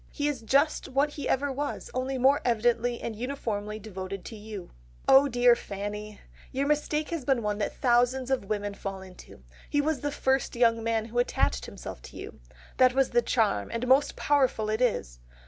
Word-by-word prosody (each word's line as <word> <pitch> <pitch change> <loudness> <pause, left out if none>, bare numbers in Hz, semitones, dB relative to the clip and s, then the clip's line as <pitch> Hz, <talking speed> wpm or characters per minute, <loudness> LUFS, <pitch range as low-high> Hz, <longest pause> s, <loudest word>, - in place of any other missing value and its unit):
He 290 -1 -2
is 285 -5 -2
just 280 +7 +2
what 280 +3 +1
he 290 - -5
ever 280 +1 +1
was, 285 +2 -4
only 260 +1 -2
more 270 +3 +4
evidently 240 0 +1
and 225 - -4
uniformly 215 -4 -3
devoted 195 -2 -7
to 225 - -7
you.... 210 -3 -8 0.4
"Oh 270 +1 +7
dear 245 -2 +5
Fanny! 210 -1 -6 0.3
Your 270 +2 -1
mistake 300 +1 0
has 330 -5 -3
been 255 -3 +1
one 210 0 -1
that 205 - -2
thousands 250 +1 +2
of 260 -6 0
women 205 0 -2
fall 195 -1 -6
into. 180 - -14 0.3
He 290 - +1
was 300 0 +1
the 290 - -2
first 265 -2 0
young 230 -1 +3
man 225 -1 0
who 235 +2 -2
attached 65 - 0
himself - - -8
to - - -12
you. - - -9 0.4
That 255 -1 +5
was 270 -1 +2
the 240 0 +4
charm, 225 -3 +1
and 230 +2 -2
most 265 +3 +4
powerful 260 -7 +1
it 220 +3 -1
is.... - - 0
240 Hz, 190 wpm, -28 LUFS, 215-270 Hz, 0.4 s, Oh